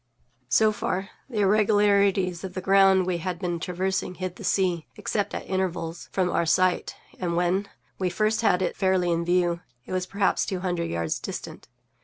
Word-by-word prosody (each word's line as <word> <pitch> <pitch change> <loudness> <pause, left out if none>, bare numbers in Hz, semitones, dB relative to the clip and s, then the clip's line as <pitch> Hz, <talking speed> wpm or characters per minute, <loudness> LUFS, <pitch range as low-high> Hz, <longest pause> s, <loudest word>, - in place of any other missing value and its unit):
So 220 +7 +4
far, 195 -2 -3 0.2
the 220 -5 -1
irregularities 200 -3 +3
of 185 -2 -6
the - - -2
ground 195 0 +5
we 180 -2 -1
had 180 +1 -3
been 175 -1 -2
traversing 185 +2 -2
hid 185 -1 -4
the - - -9
sea, 180 -4 +1
except 205 -2 -2
at - - -6
intervals, 175 -3 -3
from 185 -2 +1
our - - +1
sight, 185 +2 +2 0.2
and, 175 -2 -1
when 180 +3 +1 0.3
we 185 -1 +1
first 215 +5 +1
had 190 -5 +3
it - - -1
fairly 185 -2 +2
in 170 0 +1
view, 175 0 +1 0.3
it - - -10
was 185 0 -1
perhaps 200 0 +1
two 185 -2 -3
hundred 175 -2 -1
yards 85 -1 -2
distant. - - -7
185 Hz, 180 wpm, -26 LUFS, 175-195 Hz, 0.3 s, ground